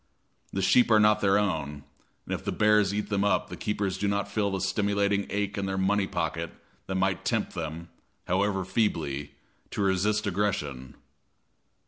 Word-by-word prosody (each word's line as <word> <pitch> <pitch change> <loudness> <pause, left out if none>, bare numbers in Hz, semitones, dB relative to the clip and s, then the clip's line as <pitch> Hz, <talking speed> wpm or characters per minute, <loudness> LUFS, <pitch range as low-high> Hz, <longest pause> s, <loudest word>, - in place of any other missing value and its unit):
The 95 - -2
sheep 120 +6 +5
are 110 -1 +6
not 105 0 +4
their 100 0 +4
own, 75 -8 -1 0.4
and - - -4
if - - -4
the - - -2
bears 105 -2 +3
eat 105 +1 -2
them 100 -1 +1
up 100 -2 +1
the - - -6
keepers 100 -3 -2
do 100 - 0
not 100 0 0
feel 100 0 0
the 95 -1 -2
stimulating 100 +1 +1
ache 100 0 -2
in 100 - -2
their 95 0 -2
money 95 +1 +2
pocket - - -3 0.3
that 95 - -3
might 95 0 0
tempt - - -1
them, 80 +1 -5 0.4
however 95 +1 0
feebly, 75 - -1 0.3
to 100 - -2
resist 105 +3 +1
aggression. 85 -10 -2
100 Hz, 170 wpm, -28 LUFS, 95-105 Hz, 0.4 s, are